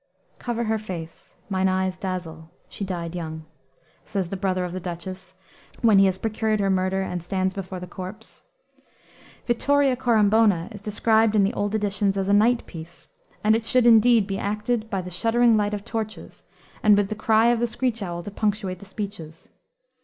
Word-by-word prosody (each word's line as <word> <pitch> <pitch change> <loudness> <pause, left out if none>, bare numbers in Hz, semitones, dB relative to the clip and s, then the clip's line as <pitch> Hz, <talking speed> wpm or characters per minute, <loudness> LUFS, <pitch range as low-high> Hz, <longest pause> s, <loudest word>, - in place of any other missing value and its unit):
"Cover 235 -1 -2
her 220 -1 0
face; 170 -6 -8
mine 190 -1 +1
eyes 185 0 0
dazzle; 170 -4 -6 0.2
she - - -7
died 175 -3 -4
young," 160 -2 -6 0.6
says 195 -5 -3
the 195 - -4
brother 185 -1 -1
of 180 - -5
the 185 - -3
Duchess, 185 +2 -7 0.5
when 215 -4 +6
he 195 - +6
has 185 -1 0
procured 215 0 -1
her 195 -1 +1
murder 190 +1 0
and 180 -2 -4
stands 185 +2 -1
before 185 -1 -6
the 180 - -7
corpse. 190 +4 -9 1.0
Vittoria 275 +2 +2
Corombona 220 -6 +3
is 205 -3 -9
described 220 +1 +2
in 205 - +5
the 195 - +1
old 205 +1 -1
editions 200 -1 0
as 195 0 -1
"a - - +4
night 230 +4 +3
piece," 165 +1 -11 0.3
and 215 +1 +4
it 225 - -1
should, 240 +2 +2
indeed, 230 -1 +6
be 195 -1 -3
acted 215 +2 -2
by 195 -4 -2
the 180 - -8
shuddering 230 +5 +3
light 210 0 +1
of 205 +1 -8
torches, 220 -2 -6 0.4
and 210 -1 +5
with 205 -1 +1
the - - -2
cry 220 +1 +3
of 240 -1 +2
the 240 - +1
screech 235 -1 -2
owl 175 -3 -4
to 205 - -7
punctuate 205 -3 -2
the 200 - -12
speeches. 190 -6 -8
200 Hz, 185 wpm, -24 LUFS, 185-220 Hz, 1.0 s, when